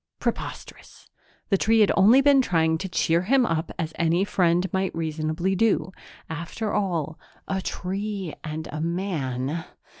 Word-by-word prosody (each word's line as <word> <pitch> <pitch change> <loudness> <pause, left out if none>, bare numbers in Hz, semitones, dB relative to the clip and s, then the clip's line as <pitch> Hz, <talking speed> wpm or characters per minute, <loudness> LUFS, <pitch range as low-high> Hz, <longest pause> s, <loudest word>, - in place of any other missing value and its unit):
Preposterous! - - -6 0.4
The 195 - +2
tree 225 +1 +4
had 210 - +5
only 230 +8 +6
been 280 -1 +5
trying 160 -7 +1
to 190 - -4
cheer 170 -1 +2
him 250 +7 +3
up 165 -4 -1
as 160 -1 -3
any 170 +2 +2
friend 180 -3 +2
might 190 -1 -1
reasonably 160 +3 -1
do. 205 -2 +1 0.4
After 170 +7 -4
all, 165 -5 -1 0.3
a 190 0 -1
tree 195 -1 -4
and 155 0 -5
a 155 - -4
man.... 160 -4 -2
175 Hz, 145 wpm, -25 LUFS, 160-195 Hz, 0.4 s, only